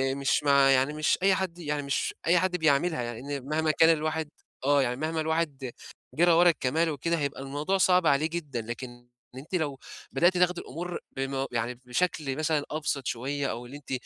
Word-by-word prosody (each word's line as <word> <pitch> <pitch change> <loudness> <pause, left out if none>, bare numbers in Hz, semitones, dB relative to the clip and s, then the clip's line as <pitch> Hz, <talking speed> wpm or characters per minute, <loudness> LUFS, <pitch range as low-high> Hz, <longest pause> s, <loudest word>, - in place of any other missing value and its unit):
مش 140 0 +1
مع 140 -1 +5
يعني 135 +2 +3
مش 155 0 +1
أي 195 -1 +5
حد 180 -2 -3
يعني 150 -2 -2
مش 140 +2 -1
أي 175 +1 +5
حد 180 0 0
بيعملها، 145 -5 +1
لإن 135 +3 -6
مهما 155 +1 +1
إن - - +3
كان 165 - +7
الواحد 155 0 -2 0.4
آه، 145 0 +4
يعني 125 -2 0
مهما 155 +3 -2
الواحد 155 -5 -2 0.4
جرى 175 +2 +4
ورا 175 +1 +6
الكَمال 160 +2 +1
وكده، 165 +3 -1
هيبقى 140 -1 -3
الموضوع 145 +8 -1
صعب 180 -2 +4
عليه 145 +3 +3
جدًا، 150 -8 -4
لكن 120 +1 -8 0.3
إن - - -7
أنتِ 160 +7 -6
لو 145 -6 -2 0.3
بدأتِ 175 +7 +3
تاخدي 180 0 +2
الأمور 175 +5 -6 0.2
بم 135 0 -2
يعني 120 +1 -2
بشكل 140 0 -1
مثلًا 155 -2 0
أبسط 150 -3 -2
شوية 140 +4 -2
أو 120 - -6
اللي 135 +4 -9
أنتِ 145 - -13
150 Hz, 190 wpm, -28 LUFS, 135-165 Hz, 0.4 s, كان